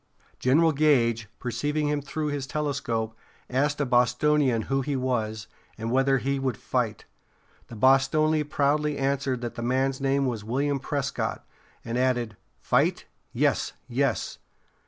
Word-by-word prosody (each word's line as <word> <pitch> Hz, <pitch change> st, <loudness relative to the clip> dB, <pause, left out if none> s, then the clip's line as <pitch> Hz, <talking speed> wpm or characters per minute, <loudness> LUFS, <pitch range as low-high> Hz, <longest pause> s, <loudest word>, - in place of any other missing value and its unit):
General 160 Hz, +6 st, +4 dB
Gage, 120 Hz, -7 st, +2 dB
perceiving 145 Hz, +5 st, -1 dB
him 145 Hz, 0 st, 0 dB
through 150 Hz, +2 st, -3 dB
his 145 Hz, -2 st, -3 dB
telescope, 130 Hz, -7 st, -2 dB, 0.4 s
asked 145 Hz, +3 st, +1 dB
a 145 Hz, -, +1 dB
Bostonian 125 Hz, 0 st, +2 dB
who 135 Hz, 0 st, 0 dB
he 140 Hz, +1 st, -2 dB
was, 110 Hz, -4 st, -1 dB, 0.3 s
and 115 Hz, +1 st, -3 dB
whether 135 Hz, +1 st, +3 dB
he 135 Hz, +2 st, -1 dB
would 130 Hz, -4 st, -1 dB
fight. -, -, -2 dB, 0.6 s
The 115 Hz, -, -10 dB
Bostonian 145 Hz, +5 st, +3 dB
proudly 150 Hz, 0 st, +1 dB
answered 135 Hz, -2 st, 0 dB
that 120 Hz, -1 st, -4 dB
the -, -, -6 dB
man's 130 Hz, +3 st, 0 dB
name 135 Hz, 0 st, +2 dB
was 115 Hz, -5 st, -2 dB
William 140 Hz, +5 st, 0 dB
Prescott, 140 Hz, 0 st, -3 dB, 0.4 s
and 120 Hz, +1 st, -2 dB
added: 120 Hz, -4 st, 0 dB, 0.2 s
"Fight? -, -, +1 dB, 0.3 s
Yes, -, -, +1 dB
yes! -, -, -1 dB
135 Hz, 135 wpm, -26 LUFS, 125-145 Hz, 0.6 s, General